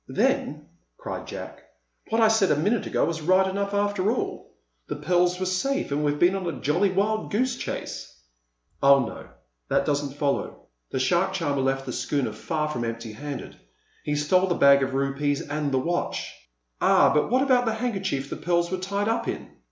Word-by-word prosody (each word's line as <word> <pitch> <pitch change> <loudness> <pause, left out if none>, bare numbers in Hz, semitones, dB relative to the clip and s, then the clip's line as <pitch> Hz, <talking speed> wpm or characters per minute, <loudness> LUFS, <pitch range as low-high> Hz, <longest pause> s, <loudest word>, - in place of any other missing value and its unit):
"Then," - - 0 0.3
cried - - -6
Jack, - - -8 0.5
"what 225 - +1
I 220 - +7
said 220 -3 +3
a - - +4
minute 205 +9 0
ago - - +1
was 165 -1 -3
right 185 +4 +4
enough, 200 +1 -2
after 205 -1 +1
all. 245 - -4 0.4
The - - -3
pearls 175 +3 +1
were 185 - -1
safe, 185 - -1
and 145 +1 0
we've 145 0 +1
been 175 +4 +4
on 190 -2 -3
a 170 - -4
jolly 175 +8 +2
wild 210 +3 0
goose 245 +4 +1
chase." - - -5 0.7
"Oh, 140 -2 +6
no; - - -8 0.4
that - - +2
doesn't 145 -1 -1
follow. 145 -2 -2 0.3
The - - -3
shark 150 +8 +2
charmer 145 -6 -1
left 135 0 0
the 125 - -4
schooner 135 -7 -1
far 150 +8 -2
from 125 -6 -3
empty 115 -1 -5
handed. 145 +4 -7 0.5
He 150 - -1
stole 180 +6 +2
the 175 - 0
bag 140 0 +6
of 130 0 -1
rupees 140 +1 0
and 145 -1 -3
the 135 - +2
watch." 175 +7 -2 0.5
"Ah, - - +5
but 150 - +2
what 255 +3 +3
about 255 -3 +3
the 225 -1 0
handkerchief 195 - -2
the - - -3
pearls 170 0 0
were 185 - -1
tied 200 +2 -2
up 225 - 0
in?" - - -5
170 Hz, 190 wpm, -25 LUFS, 140-200 Hz, 0.7 s, I